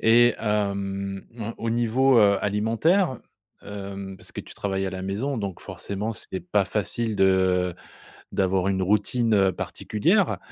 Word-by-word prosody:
Et, 120 +1 +5
hem, 100 -2 -2
on 115 +1 -4
au 115 - -2
niveau, 120 +2 +3
heu, 100 -2 +5
alimentaire, 115 - +1 0.4
hem 100 -1 -7
parce - - -13
que - - -5
tu - - -13
travailles 95 -1 -2
à - - -2
la 95 0 -6
maison, 115 +8 -2
donc, 100 -4 -4
forcément, 105 +3 -4
c'est 95 -3 -3
pas 95 +3 +1
facile 110 +2 -1
de 95 -2 +3 0.6
d'avoir 95 0 +1
une 95 -1 0
routine, 105 +4 +2
heu, 95 -2 +4
particulière, 170 - 0
100 Hz, 150 wpm, -25 LUFS, 95-115 Hz, 0.6 s, Et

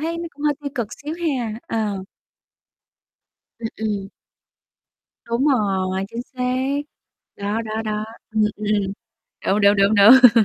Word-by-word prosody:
thấy 330 +2 -2
nó 340 - -4
cũng 290 - -11
hơi 295 - +4
tiêu 285 -1 -4
cực 235 -4 -1 0.2
xíu 300 +2 -4
ha. 235 -6 -2
Ờ. 210 -4 -2 1.6
Ừm, 225 -1 -3
ừm. 205 -3 -2 1.2
Đúng 235 +3 0
rồi, 190 -6 +1
chính 230 +2 -5
xác. 255 +2 -1 0.6
Đó, 205 +3 -2
đó, 220 0 -3
đó. 215 0 -2 0.3
Ừm, 220 -1 +1
ừm, 210 - -5
ừm. 200 -2 0 0.5
Đúng, 200 +2 +3
đúng, 200 0 +5
đúng, 200 +2 +4
đúng. 230 +2 +8
220 Hz, 145 wpm, -22 LUFS, 205-255 Hz, 1.6 s, đúng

